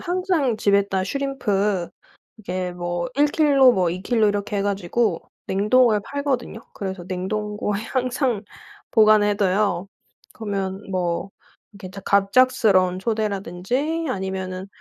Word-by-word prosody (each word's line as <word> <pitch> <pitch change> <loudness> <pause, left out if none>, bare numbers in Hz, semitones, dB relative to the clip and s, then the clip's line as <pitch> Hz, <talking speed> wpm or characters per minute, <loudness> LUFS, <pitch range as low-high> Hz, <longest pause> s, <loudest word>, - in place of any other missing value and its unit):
항상 350 - 0
집에다 200 -2 +1
슈림프 210 -7 -1 0.5
이게 185 -3 -4
뭐 175 0 -3
1 290 +2 +4
킬로, 285 -4 +5
뭐 180 -6 +1
2 180 +2 -5
킬로 220 0 +2
이렇게 205 0 -2
해 195 - 0
가지고 200 0 0 0.3
냉동을 215 +3 +3
팔거든요. 280 -3 -3
그래서 190 -3 -5
냉동고에 210 +2 -3
항상 255 -3 0 0.5
보관을 215 -2 +5
해 205 - +2
둬요. 195 -2 +1 0.5
그러면 195 -3 -4
뭐 180 0 -2 0.4
이렇게 195 -2 -10
작 195 +1 -10
갑작스러운 200 -3 +3
초대라든지 220 - -2
아니면은 190 -3 -4
205 Hz, 270 characters per minute, -22 LUFS, 190-245 Hz, 0.5 s, 킬로